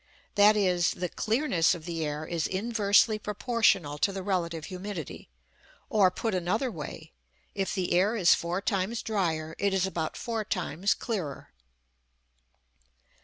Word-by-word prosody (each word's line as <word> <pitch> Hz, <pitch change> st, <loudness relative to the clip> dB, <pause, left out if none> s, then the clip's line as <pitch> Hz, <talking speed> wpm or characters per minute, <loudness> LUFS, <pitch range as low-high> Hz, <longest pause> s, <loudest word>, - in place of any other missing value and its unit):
That 210 Hz, +1 st, +6 dB
is, 180 Hz, -3 st, +2 dB
the 180 Hz, 0 st, -3 dB
clearness 215 Hz, -, +1 dB
of 160 Hz, -2 st, -10 dB
the 165 Hz, -2 st, -3 dB
air 150 Hz, +1 st, -3 dB
is 165 Hz, -1 st, -1 dB
inversely 215 Hz, +1 st, +2 dB
proportional 210 Hz, -, +1 dB
to 200 Hz, -, +2 dB
the 195 Hz, -1 st, -5 dB
relative 170 Hz, -5 st, -2 dB
humidity; 185 Hz, -, -7 dB, 0.6 s
or, 200 Hz, -4 st, +5 dB
put 215 Hz, +4 st, -3 dB
another 190 Hz, +8 st, 0 dB
way, 160 Hz, -2 st, -8 dB, 0.4 s
if 195 Hz, 0 st, -2 dB
the 185 Hz, -2 st, -1 dB
air 195 Hz, +6 st, +3 dB
is 185 Hz, -6 st, +5 dB
four 175 Hz, +3 st, -2 dB
times 215 Hz, +2 st, -1 dB
drier 165 Hz, -7 st, -1 dB
it 200 Hz, 0 st, +1 dB
is 190 Hz, -1 st, +2 dB
about 165 Hz, -4 st, -3 dB
four 230 Hz, -2 st, -3 dB
times 190 Hz, -2 st, -1 dB
clearer. 180 Hz, -, -5 dB
190 Hz, 140 wpm, -28 LUFS, 170-210 Hz, 0.6 s, That